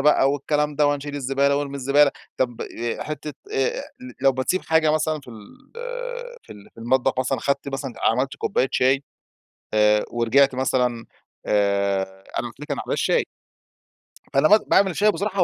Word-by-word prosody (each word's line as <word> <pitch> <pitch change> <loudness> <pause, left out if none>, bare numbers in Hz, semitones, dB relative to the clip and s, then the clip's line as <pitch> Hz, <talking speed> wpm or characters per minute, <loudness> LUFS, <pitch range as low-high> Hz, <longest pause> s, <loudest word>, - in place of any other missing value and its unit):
بقى 140 -1 +4
والكلام 150 +1 -1
ده 150 0 +4
وهنشيل 145 0 -2
الزبالة 140 0 +1
وارمي 140 -1 -3
الزبالة، 140 +2 +4 0.3
طب 120 -2 -1 0.4
حتّة 150 0 -5 0.2
آآ 485 +3 0 0.4
لو 135 0 +4
بتسيب 130 +8 -1
حاجة 160 -1 +3
مثلًا 155 0 0
في 135 - -18
ال 110 -3 -11 1.0
في - - -12
ال 100 -1 -15
في - - -13
المطبخ 130 +2 +1
مثلًا، 130 +1 0
أخدت 140 0 -1
مثلًا 135 -1 -4
عملت 130 +4 +1
كباية 130 - 0
شاي، 135 +2 +2 0.7
آآ 105 0 +4
ورجعت 125 +4 +3
مثلًا، 125 -3 0 0.4
آآ، 100 -1 +2 0.3
أنا - - -1
قلت - - -16
لِك - - -9
على - - -1
موضوع - - -4
الشاي - - +1 1.1
فأنا 140 +3 +4
م 210 - +7
باعمل 190 -3 +3
شاي 210 +1 +4
بصراحة 200 -2 0
135 Hz, 160 wpm, -23 LUFS, 125-150 Hz, 1.1 s, م